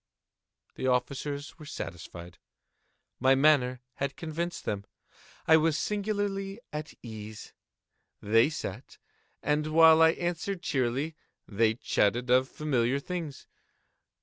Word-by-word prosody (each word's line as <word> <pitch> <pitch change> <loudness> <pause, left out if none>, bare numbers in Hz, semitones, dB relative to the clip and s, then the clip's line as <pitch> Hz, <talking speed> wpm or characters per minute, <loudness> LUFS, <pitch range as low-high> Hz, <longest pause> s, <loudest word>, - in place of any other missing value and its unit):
The 130 - -3
officers 140 +4 -2
were 155 - -10
satisfied. 85 - -8 0.8
My 130 +1 +5
manner 130 -3 +3 0.2
had 140 0 -2
convinced 170 +2 -4
them. 100 -1 -3 0.6
I 160 - +8
was 160 -1 +2
singularly 200 0 -2
at 150 +1 -5
ease. 110 -2 -9 0.7
They 115 +6 +4
sat, 130 -6 -6 0.5
and 150 +1 +1
while 160 +1 +7
I 160 0 +7
answered 175 +2 -3
cheerily, 135 +3 0 0.3
they 110 +1 +2
chatted 120 +1 +1
of 130 +1 +4
familiar 135 -3 0
things. 165 -3 -5
140 Hz, 110 wpm, -29 LUFS, 120-160 Hz, 0.8 s, I